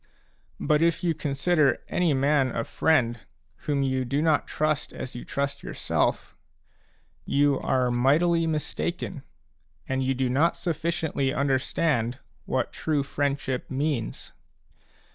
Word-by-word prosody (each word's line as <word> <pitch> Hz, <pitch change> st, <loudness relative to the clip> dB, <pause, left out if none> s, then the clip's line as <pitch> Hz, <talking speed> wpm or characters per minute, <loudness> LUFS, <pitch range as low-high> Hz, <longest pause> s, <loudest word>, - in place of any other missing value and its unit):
But 150 Hz, 0 st, +2 dB
if 170 Hz, 0 st, +2 dB
you 170 Hz, -2 st, +2 dB
consider 145 Hz, -1 st, +2 dB
any 175 Hz, -3 st, +1 dB
man 140 Hz, 0 st, +3 dB
a 115 Hz, -, 0 dB
friend 120 Hz, -7 st, +1 dB, 0.5 s
whom 140 Hz, -2 st, +1 dB
you 130 Hz, -1 st, 0 dB
do 135 Hz, +3 st, -1 dB
not 155 Hz, -1 st, +2 dB
trust 155 Hz, -1 st, -1 dB
as 130 Hz, -, -6 dB
you 120 Hz, -, -6 dB
trust 140 Hz, 0 st, -3 dB
yourself, -, -, -1 dB, 0.9 s
you 145 Hz, -1 st, +2 dB
are 130 Hz, -2 st, +1 dB
mightily 165 Hz, +7 st, +3 dB
mistaken 160 Hz, +1 st, -3 dB, 0.7 s
and 130 Hz, 0 st, 0 dB
you 130 Hz, +1 st, +1 dB
do 130 Hz, 0 st, 0 dB
not 145 Hz, +7 st, +2 dB
sufficiently 160 Hz, -4 st, -1 dB
understand 135 Hz, -2 st, 0 dB, 0.3 s
what -, -, -1 dB
true 150 Hz, -3 st, 0 dB
friend 140 Hz, 0 st, -1 dB
ship 130 Hz, -2 st, -4 dB
means. 135 Hz, -4 st, -2 dB
140 Hz, 125 wpm, -26 LUFS, 130-155 Hz, 0.9 s, man